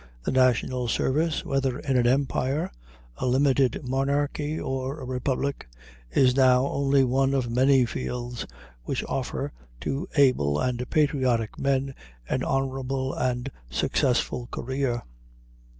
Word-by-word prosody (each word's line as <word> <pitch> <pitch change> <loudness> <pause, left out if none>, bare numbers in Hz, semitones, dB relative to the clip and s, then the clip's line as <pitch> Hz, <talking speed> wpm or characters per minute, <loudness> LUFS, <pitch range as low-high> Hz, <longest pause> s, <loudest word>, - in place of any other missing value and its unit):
The - - -1
national 130 -1 +2
service, 150 +7 0
whether 135 -2 0
in 135 -3 -2
an 120 -1 +3
empire, 135 +2 0 0.5
a - - -2
limited 135 0 +2
monarchy, 145 +3 0
or 135 +3 -3
a 130 - -7
republic, 130 - -2 0.4
is 125 - +3
now 130 -1 +5
only 140 -1 +2
one 135 +2 +2
of 125 -3 -1
many 130 +1 +4
fields 120 0 -4 0.4
which - - -2
offer - - -3 0.3
to 140 +7 -2
able 125 - +3
and 125 0 -1
patriotic 130 -7 +1
men 135 0 0 0.3
an 130 - -1
honorable 135 0 -1
and 125 +1 -1 0.2
successful 120 - 0
career. 130 -1 -2
130 Hz, 120 wpm, -26 LUFS, 125-140 Hz, 0.5 s, now